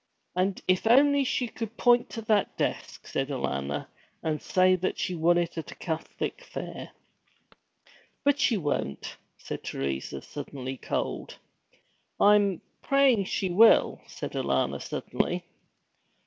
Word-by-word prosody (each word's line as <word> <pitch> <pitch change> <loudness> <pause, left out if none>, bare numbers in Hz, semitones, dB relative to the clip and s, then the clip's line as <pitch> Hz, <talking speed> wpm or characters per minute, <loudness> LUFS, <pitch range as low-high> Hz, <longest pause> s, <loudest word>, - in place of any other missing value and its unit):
'And 185 +1 0
if 185 +4 +2
only 280 +4 +5
she 250 -1 0
could 225 0 -7
point 240 -1 +4
to 225 - -6
that 215 -2 +1
desk,' - - -3
said 135 +1 -2
Alanna, 70 - -2 0.4
'and 155 -1 -1
say 185 0 +4
that 185 +1 -2
she 185 - -2
won 175 +1 +3
it 170 -1 -1
at 160 - -7
a - - -9
Catholic 165 - -4
fair.' - - -7 1.3
'But 285 0 +3
she 250 -5 +3
won't,' 145 - -3 0.2
said - - -7
Teresa, 70 0 -4
suddenly 135 -2 -6
cold. - - -3 0.8
'I'm 205 -3 +4 0.2
praying 275 -7 +3
she 185 0 -1
will,' 220 +6 +5
said - - -6
Alanna - - 0
suddenly. - - -2
185 Hz, 130 wpm, -28 LUFS, 150-230 Hz, 1.3 s, only